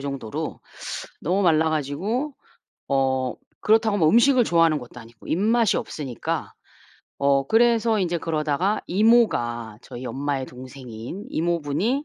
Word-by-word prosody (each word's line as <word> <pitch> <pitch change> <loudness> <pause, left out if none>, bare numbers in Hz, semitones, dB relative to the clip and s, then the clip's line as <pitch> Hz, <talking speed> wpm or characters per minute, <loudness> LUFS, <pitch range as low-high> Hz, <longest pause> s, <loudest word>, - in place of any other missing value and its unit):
정도로 135 -5 -5 0.6
너무 185 +5 0
말라 160 -3 +3
가지고 190 - -2 0.5
어 130 -2 +1 0.3
그렇다고 220 -1 +3
뭐 160 -4 +4
음식을 245 - +5
좋아하는 165 -5 +3
것도 125 -1 -11
아니고 115 0 -16
입맛이 220 +5 +2
없으니까. 135 -6 -4 0.7
어 140 -1 +2
그래서 230 0 +3
이제 175 -3 0
그러다가 160 +5 0
이모가 145 - +2
저희 120 +1 -9
엄마의 140 0 -2
동생인 125 - -9
이모분이 170 - 0
160 Hz, 300 characters per minute, -24 LUFS, 135-215 Hz, 0.7 s, 음식을